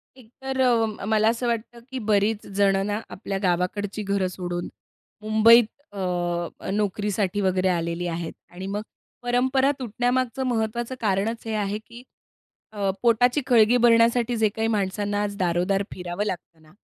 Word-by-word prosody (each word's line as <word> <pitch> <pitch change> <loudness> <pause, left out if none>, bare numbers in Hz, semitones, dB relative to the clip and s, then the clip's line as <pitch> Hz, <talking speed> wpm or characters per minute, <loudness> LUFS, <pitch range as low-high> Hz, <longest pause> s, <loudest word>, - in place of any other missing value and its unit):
एक, 250 -4 -17
तर 265 0 -3
अ, 225 -5 +1
मला 215 +1 +3
असं 235 +2 -1
वाटतं 235 0 -3
की 260 - -3
बरीच 210 +1 +2
जण 195 -1 +4
ना 205 +1 -1
आपल्या 195 -1 -4
गावाकडची 190 +4 -1
घरं 200 -1 0
सोडून 175 -1 -4 0.5
मुंबईत 220 +2 +6 0.3
अ, 175 -3 -3
नोकरीसाठी 205 -1 -1
वगैरे 190 -1 +1
आलेली 170 0 -1
आहेत. 165 -1 -4 0.2
आणि 185 +2 -8
मग 205 +2 -2 0.4
परंपरा 260 +3 +2
तुटण्यामागचं 250 +2 -1
महत्त्वाचं 235 +1 -1
कारणच 215 +2 0
हे 225 - -3
आहे 205 -1 -1
की 235 +1 -12 0.7
अ, 200 -2 -1
पोटाची 245 +4 +3
खळगी 240 -1 +5
भरण्यासाठी 235 0 +4
जे 220 -1 +3
काही 220 +2 -2
माणसांना 205 -1 -1
आज 205 -1 -3
दारो-दार 180 +2 +1
फिरावं 180 +2 -4
लागतं 175 -4 -6
ना 155 0 -20
210 Hz, 145 wpm, -24 LUFS, 190-235 Hz, 0.7 s, मुंबईत